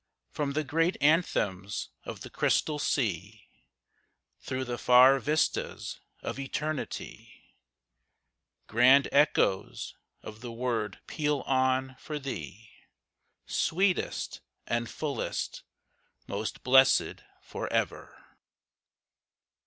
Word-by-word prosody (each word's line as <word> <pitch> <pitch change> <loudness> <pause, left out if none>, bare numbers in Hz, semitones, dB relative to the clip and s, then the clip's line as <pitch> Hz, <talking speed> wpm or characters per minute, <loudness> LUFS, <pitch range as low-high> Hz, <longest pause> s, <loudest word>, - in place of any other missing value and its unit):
From 145 -2 -2
the 155 +2 0
great 165 +5 +1
anthems 105 - +1 0.2
of - - -7
the - - -9
Crystal 150 -1 +1
Sea, 105 - -2 0.9
Through 130 0 -3
the 120 -1 -4
far 130 +2 +7
vistas 150 +3 -1 0.2
of - - -4
Eternity, 150 +2 -5 1.1
Grand 130 +5 +5
echoes 140 -9 +2 0.3
of 110 +1 -10
the 120 -1 -6
word 115 -3 -2
peal 150 -3 -1
on 130 0 +1
for 150 - -5
thee, 110 - -7 0.7
Sweetest 185 +2 0 0.2
and 115 0 -1
fullest: 150 -3 -3 0.6
'Most 105 +2 -4
blessed 130 +1 +4 0.2
for - - -6
ever.' - - -2
130 Hz, 90 wpm, -29 LUFS, 115-150 Hz, 1.1 s, far